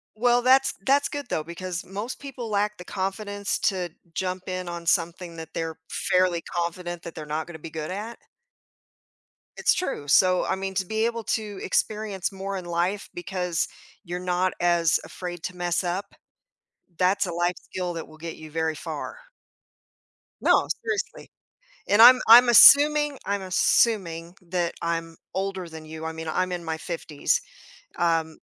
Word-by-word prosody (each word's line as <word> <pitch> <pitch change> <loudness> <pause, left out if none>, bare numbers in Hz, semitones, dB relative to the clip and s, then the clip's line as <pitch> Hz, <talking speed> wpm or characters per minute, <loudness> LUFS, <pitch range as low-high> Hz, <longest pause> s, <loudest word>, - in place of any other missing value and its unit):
Well, 245 +2 +3
that's 265 +2 +5
that's 280 +1 +3
good 290 -1 -5
though, 155 - -1
because 175 +2 -5
most 205 +6 -6
people 270 -4 -7
lack 210 0 0
the 180 - -10
confidence 200 +2 -3
to 185 -3 0 0.2
jump 185 0 -3
in 185 -1 -4
on 170 -1 -6
something 170 0 -1
that 160 0 -9
they're 165 -1 -3
fairly 185 -2 +1
confident 175 0 -4
that 170 - -8
they're 155 - -7
not 155 +1 -3
gonna 170 -2 -9
be 160 - -9
good 155 -1 -5
at. 215 +5 -6 1.4
It's - - +3
true, 270 - -3
so, 185 +4 +4
I - - 0
mean 190 0 -4
to 190 - 0
be 220 +3 0
able 230 -1 -2
to 210 -3 -2
experience 210 -1 -1
more 195 0 -5
in 180 - -7
life 175 +4 -1
because 180 -2 -2 0.4
you're 175 -1 -5
not 180 0 0
as 170 -2 +3
afraid 175 -2 -7
to 180 - -5
mess 175 0 -1
up, 185 +3 -3 0.8
that's 185 +2 +3
a 175 - -4
life 175 +1 0
skill 180 -2 -5
that 165 - -5
will 155 0 -16
get 165 0 -7
you 155 0 -11
very 160 0 -1
far. 155 - -6 1.2
No, - - +4 0.2
seriously, 440 -3 -4 0.6
and 205 +3 +6
I'm 250 +1 +10
I'm 240 +2 +10
assuming 290 +4 +8
I'm 200 -1 -2
assuming 180 -3 +1
that 175 -1 -2
I'm 165 -1 -2 0.2
older 190 -2 -3
than 160 -1 -10
you, 160 +1 -8
I 160 - -3
mean, 160 0 -7
I'm 185 +3 -1
in 175 -1 -4
my 160 -1 -3
50s, 160 -3 -1 0.6
um 165 -2 0
180 Hz, 165 wpm, -25 LUFS, 170-205 Hz, 1.4 s, I'm